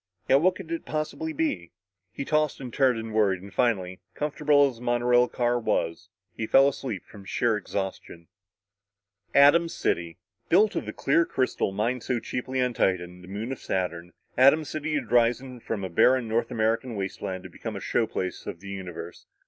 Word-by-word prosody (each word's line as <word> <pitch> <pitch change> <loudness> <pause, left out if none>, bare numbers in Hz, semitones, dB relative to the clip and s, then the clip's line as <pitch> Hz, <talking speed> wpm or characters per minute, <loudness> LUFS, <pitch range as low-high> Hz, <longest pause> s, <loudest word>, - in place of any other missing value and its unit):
Yet 135 +2 +5
what 185 +2 +3
could 170 -4 -9
it 165 - -3
possibly 155 +1 -3
be? 140 - -2 0.4
He 140 - -5
tossed 155 0 +1
and 125 -3 -7
turned 130 -4 +3
and 110 -1 -6
worried 100 -4 +2
and 100 - -11
finally 95 -7 0 0.2
comfortable 150 -1 +3
as 130 -4 -6
the - - -15
monorail 120 0 +3
car 120 0 0
was 85 -5 -1 0.3
he 110 - -3
fell 135 +3 +6
asleep 130 -8 -4
from 100 - -13
sheer 115 +4 +1
exhaustion. 95 -4 -5 1.1
Atom 145 +4 +6
City! 85 - -2 0.3
Built 205 +5 +4
of - - -3
the - - -3
clear 170 - +2
crystal 130 -9 -1
mined 115 +5 -1
so 125 0 -1
cheaply 130 +3 -4
on 125 -1 0
Titan, 90 -3 -1
moon 105 +6 -4
of 135 - -5
Saturn, 90 -2 -3 0.3
Atom 140 +4 +6
City 155 +2 -3
had 125 -7 -3
risen 120 +1 +2
from 110 -3 -4
a - - -2
barren 125 +7 +3
North 115 +1 0
American 115 +2 0
wasteland 95 -1 -4
to 95 - -9
become 110 +4 -6
a - - -4
show 110 +3 0
place 90 -4 -4
of 85 - -5
the 100 +2 -10
universe. 95 -3 -8
120 Hz, 180 wpm, -26 LUFS, 95-135 Hz, 1.1 s, fell